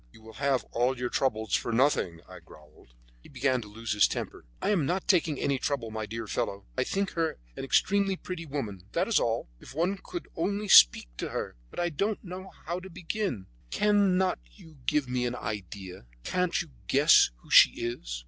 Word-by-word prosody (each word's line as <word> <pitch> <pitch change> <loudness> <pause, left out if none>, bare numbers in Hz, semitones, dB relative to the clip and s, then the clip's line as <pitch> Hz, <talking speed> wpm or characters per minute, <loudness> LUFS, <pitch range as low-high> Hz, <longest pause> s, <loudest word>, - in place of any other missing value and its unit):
"You 110 - -18
will 110 0 -12
have 135 -2 +2
all 125 +2 +1
your 125 0 -2
trouble 110 -5 0
for 110 +3 -1
nothing," 115 - +1
I - - -11
growled. 75 -5 -19 0.3
He - - -16
began 130 -2 0
to 105 - -10
lose 110 +2 -6
his 105 - +5
temper. - - -5
"I - - 0
am 165 -9 +1
not 180 +2 -1
taking 165 -6 +3
any 140 -2 0
trouble, 130 -6 -2
my 110 -1 -4
dear 115 +2 -5
fellow. 100 -1 -3
I - - +1
think 195 0 -1
her 165 -1 -1 0.2
an - - -6
extremely 195 +7 +2
pretty 180 -2 -7
woman, 105 -11 -5
that 175 +3 +1
is 230 - +3
all. 115 - -1
If - - -13
one 180 +5 0
could 350 - -6
only 200 +4 -2
speak - - +8
to - - -3
her! - - -4
But - - -8
I 175 0 +1
don't 200 +7 -2
know 185 0 -8 0.2
how 170 +2 -2
to 190 +1 -10
begin. 175 - -3 0.2
Cannot 195 - +2
you 155 - -17
give 150 -3 +2
me 125 0 -1
an 120 - -3
idea? 95 - -7 0.2
Can't 180 -1 0
you 160 - -18 0.2
guess 145 +4 +6
who - - -17
she - - +9
is?" - - -4
140 Hz, 200 wpm, -28 LUFS, 110-180 Hz, 0.3 s, she